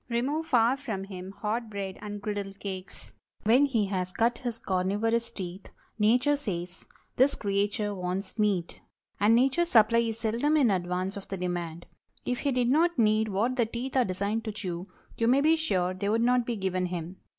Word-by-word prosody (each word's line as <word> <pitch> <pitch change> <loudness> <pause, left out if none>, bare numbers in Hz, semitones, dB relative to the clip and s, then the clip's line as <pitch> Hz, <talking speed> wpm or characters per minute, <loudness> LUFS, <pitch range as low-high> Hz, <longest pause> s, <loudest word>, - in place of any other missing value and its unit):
Remove 280 +7 -1
far 245 -2 +3
from 220 -9 -4
him 190 -1 -8
hot 220 +3 -3
bread 195 -2 -4
and 205 -1 -6
griddle 205 -2 -3
cakes. 195 -1 -8 0.3
When 245 +7 +5
he 230 -7 +1
has 185 -2 -2
cut 230 +3 +1
his 240 -2 -4
carnivorous 210 +4 0
teeth, 190 -3 -7 0.3
Nature 245 +7 +4
says—"This 195 +5 -2
creature 205 +1 -1
wants 185 +3 -4
meat." 195 -5 0 0.4
And 210 +3 +5
Nature's 270 +8 +3
supply 230 -2 +5
is 225 -1 -1
seldom 240 +8 +1
in 255 -7 +4
advance 185 +1 -1
of 200 - -9
the 195 - -4
demand. 175 -2 -4 0.4
If 250 0 -1
he 285 - 0
did 250 -1 +2
not 340 +3 +3
need 215 -1 +3
what 220 +6 0
the 235 -3 +2
teeth 245 +4 -5
are 260 - +5
designed 200 +3 -2
to 215 - -2
chew, 185 -4 -5 0.3
you 230 - +2
may 260 +3 +4
be 315 +2 +5
sure 185 - 0
they 200 +2 -2
would 225 +2 +2
not 245 0 +3
be 240 - -1
given 185 -2 -1
him. 175 +1 -5
215 Hz, 185 wpm, -28 LUFS, 190-240 Hz, 0.4 s, When